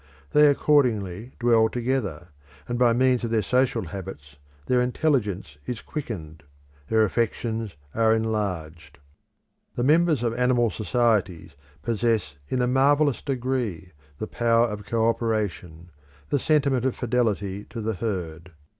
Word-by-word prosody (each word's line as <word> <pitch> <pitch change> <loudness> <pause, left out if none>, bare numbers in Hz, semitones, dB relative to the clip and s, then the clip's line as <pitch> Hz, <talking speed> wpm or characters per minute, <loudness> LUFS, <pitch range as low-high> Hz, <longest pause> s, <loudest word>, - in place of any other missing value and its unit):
They 150 0 +6
accordingly 120 -7 +1
dwell 115 -2 +4
together, 115 - -2 0.4
and 120 0 -2
by 120 -2 +5
means 125 +1 +2
of 115 - -1
their 110 -2 +1
social 125 -2 +1
habits 85 -5 -8 0.3
their 125 -1 +2
intelligence 110 - -1
is 120 -3 -3
quickened, 85 - -6 0.5
their 110 +4 +3
affections 115 - -2 0.2
are 110 0 +3
enlarged. 90 -9 -3 0.8
The 120 - -1
members 155 -1 +3
of 115 -1 0
animal 120 -2 +2
societies 105 - 0 0.3
possess 115 -9 0
in 125 -1 0
a - - +1
marvellous 140 +2 +3
degree 125 - -3 0.3
the - - -4
power 115 +1 +2
of 105 -1 -7
co 115 0 +1
operation, 100 -8 -2 0.4
the 145 - +1
sentiment 140 -4 +2
of 130 -1 0
fidelity 105 -5 -1
to 115 - -8
the 110 0 -2
herd. 90 -5 -5
115 Hz, 130 wpm, -25 LUFS, 100-125 Hz, 0.8 s, They